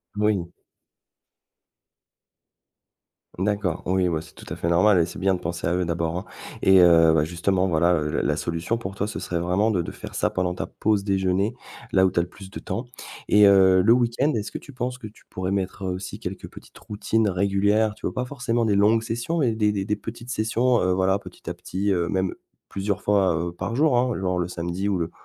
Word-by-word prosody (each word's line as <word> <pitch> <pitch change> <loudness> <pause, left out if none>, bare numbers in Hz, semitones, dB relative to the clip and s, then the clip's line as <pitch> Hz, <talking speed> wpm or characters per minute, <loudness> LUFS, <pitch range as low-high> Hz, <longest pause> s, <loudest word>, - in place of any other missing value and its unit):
Moui. 105 -4 +1 2.9
D'accord, 95 -2 -1
oui, 95 0 +1
ouais, 80 -3 -1
c'est 80 - -16
tout - - -13
à - - -2
fait - - -3
normal 95 +4 +4
et 85 - +3
c'est 95 +4 -8
bien 95 0 +2
de - - -6
penser 85 +1 -4
à 85 - +1
eux 90 0 0
d'abord, 85 0 -2
hein 90 - -5 0.4
et 95 0 +6
heu 80 -2 +6
bah, 75 -2 +3
justement, 90 +3 0
voilà, 85 0 +3
heu, 75 -3 0
la - - -1
la - - +1
solution 85 +7 -2
pour 95 -4 -6
toi 100 - -1
ce 105 - -5
serait 85 - -3
vraiment 90 +6 +1
de 95 -6 0
de - - -6
faire - - -10
ça - - 0
pendant 90 -1 -1
ta - - -3
pause 105 -2 0
déjeuner, 95 +2 0 0.4
là 95 -3 +4
où - - +4
tu 85 - +1
as - - +2
le 85 - -9
plus 95 -1 -12
de 100 - -8
temps 120 - -4 0.4
et 105 0 +6
heu, 95 -2 +6
le 110 +4 +6
week-end, 125 +4 +1
est-ce 110 -1 -2
que - - -5
tu 140 - -12
penses 125 0 -3
que 125 - -11
tu 105 - -18
pourrais 95 0 -3
mettre 95 0 -2
aussi 95 +2 -5
quelques 95 -3 -6
petites - - -15
routines 110 +1 -1
régulières, 100 +3 +1
tu - - -4
vois? - - -5
Pas 125 -1 -2
forcément 125 -3 -1
des 105 -2 +2
longues 110 +3 +3
sessions 120 +9 -3
mais 125 -6 +2
des 105 -1 +1
des 100 -2 -2
des 105 - 0
petites 120 +2 -9
sessions, 120 +2 +1
heu, 90 - +1
voilà, 95 +1 +1
petit - - -14
à - - -3
petit, 100 +2 -3
heu, 85 -2 +1
même 95 -2 0 0.4
plusieurs 100 0 -2
fois, 95 -4 +2
heu, 85 +2 -2
par 100 +6 -5
jour, 145 -2 +3
hein, 125 -1 +1
genre, 90 -1 -1
le 85 - -1
samedi 90 +2 -3
ou 100 - +1
le 85 -2 -3
95 Hz, 230 wpm, -24 LUFS, 90-110 Hz, 2.9 s, et